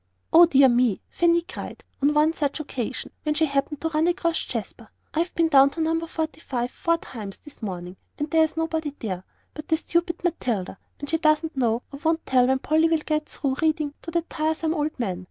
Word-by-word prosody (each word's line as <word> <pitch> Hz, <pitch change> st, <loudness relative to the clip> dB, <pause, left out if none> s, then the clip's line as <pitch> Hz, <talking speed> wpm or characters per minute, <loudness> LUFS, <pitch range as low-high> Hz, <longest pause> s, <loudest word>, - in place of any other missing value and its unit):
"O 340 Hz, +1 st, +9 dB
dear 275 Hz, -4 st, +6 dB
me!" 240 Hz, -4 st, +3 dB
Fanny 340 Hz, 0 st, +3 dB
cried, -, -, -8 dB, 0.2 s
on 290 Hz, +2 st, +3 dB
one 305 Hz, +2 st, +4 dB
such 290 Hz, -2 st, -1 dB
occasion, 260 Hz, -4 st, -4 dB
when 300 Hz, -1 st, -1 dB
she 320 Hz, +1 st, +3 dB
happened 280 Hz, 0 st, -1 dB
to 325 Hz, -, 0 dB
run 315 Hz, +1 st, +1 dB
across 340 Hz, -2 st, 0 dB
Jasper. -, -, -6 dB, 0.2 s
"I've 335 Hz, +3 st, 0 dB
been 335 Hz, -1 st, +3 dB
down 275 Hz, -3 st, +6 dB
to 325 Hz, -, -9 dB
No. 325 Hz, +1 st, 0 dB
45 310 Hz, -7 st, -3 dB
four 335 Hz, 0 st, +1 dB
times 215 Hz, -10 st, -8 dB
this 295 Hz, -3 st, -14 dB
morning, 180 Hz, -3 st, -5 dB, 0.2 s
and 295 Hz, -, -2 dB
there's 320 Hz, -1 st, +3 dB
nobody 320 Hz, -3 st, -2 dB
there 185 Hz, -5 st, -4 dB, 0.3 s
but 305 Hz, 0 st, -8 dB
that 320 Hz, -, +2 dB
stupid 340 Hz, +1 st, -1 dB
Matilda, 230 Hz, -, -2 dB, 0.2 s
and 285 Hz, -, -6 dB
she 325 Hz, +2 st, 0 dB
doesn't 310 Hz, 0 st, +2 dB
know 240 Hz, -2 st, +1 dB
or 280 Hz, -, -8 dB
won't 325 Hz, 0 st, +1 dB
tell 250 Hz, -1 st, +4 dB
when 265 Hz, 0 st, +3 dB
Polly 315 Hz, +4 st, +2 dB
will 325 Hz, -, +3 dB
get 305 Hz, -1 st, -1 dB
through 270 Hz, -2 st, -2 dB
reading 310 Hz, -2 st, +1 dB
to -, -, -7 dB
that 335 Hz, 0 st, -1 dB
tiresome 315 Hz, 0 st, -1 dB
old 305 Hz, -3 st, -2 dB
man. 190 Hz, -7 st, -2 dB
305 Hz, 205 wpm, -25 LUFS, 265-325 Hz, 0.3 s, O